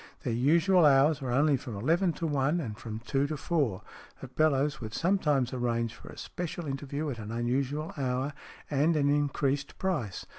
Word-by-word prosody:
Their 120 - -1
usual 165 +9 +4
hours 145 +1 +5
were 130 - -3
only 140 +2 +3
from 125 -4 -7
eleven 165 - +2
to 165 - -4
one 145 +2 +1
and 115 -10 -4
from 110 0 -7
two 140 +2 +1
to 155 0 -4
four, 140 - -1 0.4
but 130 -1 -11
Bellowes 150 -2 +2
would 110 -1 -6
sometimes 150 -8 +1
arrange 115 -2 -1
for - - -13
a - - -11
special 175 -1 -5
interview 145 +2 -3
at 120 - -6
an 110 0 -6
unusual 135 +6 -1
hour 130 +1 -1 0.4
and 150 +4 +3
an 145 -2 +2
increased 145 -1 0
price. 155 - -2
140 Hz, 180 wpm, -29 LUFS, 125-155 Hz, 0.4 s, hours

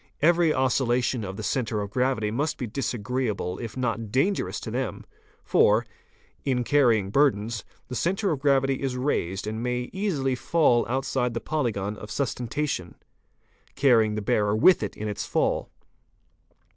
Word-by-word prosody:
Every 170 +1 +4
oscillation 125 -3 +1
of 95 -1 -6
the - - -5
centre 115 -5 -1
'of 100 -1 -4
gravity 125 -3 0
must 145 +7 -1
be 125 - -3
disagreeable 120 -4 -2
if 115 0 -6
not 115 -4 -2
dangerous 180 - 0
to 110 - -6
them, 125 0 -3 0.4
for, 110 +3 +4 0.6
in 125 -3 0
carrying 120 -8 +3
burdens, 115 -5 +1 0.2
the - - -7
centre 190 - 0
of 150 - -1
gravity 135 -1 +2
is 130 -2 -2
raised 95 -9 -1
and 110 +1 -4
may 125 0 -2
easily 170 -10 0
fall 130 -1 +2
outside 125 -1 -1
the, 115 - -2
yolygon 105 -9 -2
of 105 - -9
sustentation, 130 - -2 0.8
carrying 115 -6 +4
the 105 - -3
bearer 105 +1 +1
with 180 +12 +5
it 105 - -4
in 105 - -4
its 105 - -4
fall. - - 0
125 Hz, 150 wpm, -26 LUFS, 110-135 Hz, 0.8 s, with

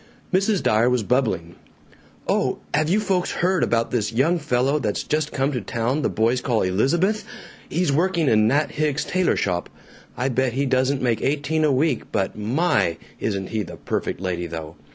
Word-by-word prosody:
Mrs. 195 +1 +2
Dyer 110 +3 +3
was 125 -3 +1
bubbling, 105 -9 0 0.7
"Oh, - - +1 0.2
have 155 +1 +2
you 200 +5 +3
folks 190 -4 0
heard 185 +1 +1
about 115 0 +1
this 110 -3 0
young 150 +9 +2
fellow 130 +2 +1
that's 105 -6 -2
just 150 0 -1
come 135 +1 0
to 125 -4 -2
town 115 +6 -1
that - - -1
the - - +1
boys 115 +3 +1
call 120 -4 +1
'Elizabeth'? 170 - +1 0.5
He's 175 -2 +1
working 170 +1 +1
in 110 -3 +4
Nat 145 +6 +1
Hicks's 150 -1 -1
tailor 185 0 +1
shop. 90 -2 -1 0.5
I 130 +2 0
bet 130 -1 0
he 140 +3 0
doesn't 130 +1 +1
make 115 -4 +1
eighteen 150 +3 0
a 150 - +3
week, 135 -1 0
but 100 -3 -1
my! 105 - +1 0.2
isn't 100 -3 -2
he 110 -1 -1
the 90 -3 -8
perfect - - -3
lady 90 -2 -3
though! 80 -1 -7
130 Hz, 185 wpm, -23 LUFS, 110-155 Hz, 0.7 s, in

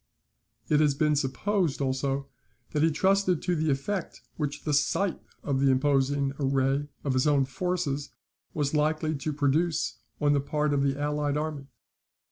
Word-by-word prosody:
It 150 - +3
has 150 -2 +3
been 150 +1 +2
supposed, 155 +5 0
also, 135 0 -1 0.4
that 150 - 0
he 165 - +5
trusted 190 +2 +2
to 180 -1 +1
the 160 -1 0
effect 165 +7 -2
which 150 -2 -3
the 150 - -1
sight 175 +6 +1 0.2
of 135 -2 0
the 135 0 +4
imposing 135 +1 +2
array 135 +1 +1 0.2
of 140 - 0
his 130 +3 +2
own 140 -2 +3
forces 145 -2 -2 0.4
was 145 -1 -1
likely 155 +1 +1
to 150 +1 -3
produce 150 +3 0 0.2
on 145 -1 +3
the 140 - +2
part 150 +1 0
of 140 - +2
the 140 0 0
allied 145 0 0
army. 150 -2 -4
145 Hz, 160 wpm, -28 LUFS, 140-155 Hz, 0.4 s, he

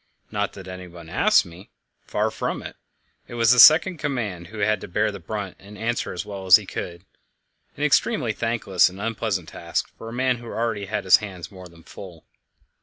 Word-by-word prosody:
Not 105 -2 -2
that 95 -1 -11
anyone 90 -3 -10
asked - - +3
me 85 +3 -14 0.4
far - - 0
from - - -3
it; - - -8 0.5
it - - -9
was 115 -1 +4
the 125 - +5
second 160 +6 +8
in - - -14
command 105 - -3
who 110 - -11
had 105 +1 +1
to - - -7
bear 105 +4 0
the 100 - -8
brunt 100 +1 -6
and 105 +1 -13
answer 115 +2 -2
as 90 - -5
well 100 -2 -7
as 90 - +10
he - - +1
could 85 +2 -7 0.7
an - - -3
extremely - - +2
thankless 115 -7 +1
and 95 +2 -12
unpleasant 105 -5 -2
task 85 0 -3
for 115 - -8
a - - -8
man 130 0 +1
who 120 - -12
already 115 -3 -2
had 110 +2 -3
his 95 - +7
hands 90 -6 -8
more 95 -2 -11
than 85 -1 -18
full. 90 -3 -12
100 Hz, 205 wpm, -23 LUFS, 90-115 Hz, 0.7 s, as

